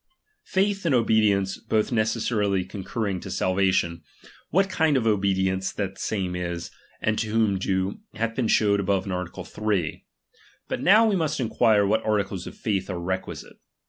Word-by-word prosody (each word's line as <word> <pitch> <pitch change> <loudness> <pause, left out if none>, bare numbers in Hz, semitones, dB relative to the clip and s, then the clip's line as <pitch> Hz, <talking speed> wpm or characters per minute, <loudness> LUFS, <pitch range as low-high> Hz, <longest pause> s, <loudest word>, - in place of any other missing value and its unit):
Faith 195 +1 +1
and 160 -6 +2
obedience 105 -4 +2
both 110 +2 0
necessarily 105 -4 +1
con 100 - -7
curring 100 -3 -2
to - - -8
salvation, 95 -2 +1 0.5
what 195 +5 +3
kind 160 -6 +2
of 120 - 0
obedience 95 -2 +1
that 95 -2 -4
same 95 -4 -2
is, 85 -1 -4 0.3
and 110 0 0
to 110 - -1
whom 105 -3 +2
due, 95 +1 -1 0.2
hath 115 +2 -1
been 120 -1 0
showed 100 -2 +3
above 100 -1 0
in 100 - -4
art. 90 -1 -3 0.2
3. 100 -7 -2 0.6
But - - -3
now 215 +5 +6
we 210 - +2
must 155 -4 -1
enquire 110 -3 +3
what 110 +3 +1
articles 100 -3 -1
of - - -9
faith 100 -4 -2
are 90 -2 -3
requisite. 95 +2 -5
100 Hz, 165 wpm, -25 LUFS, 95-115 Hz, 0.6 s, now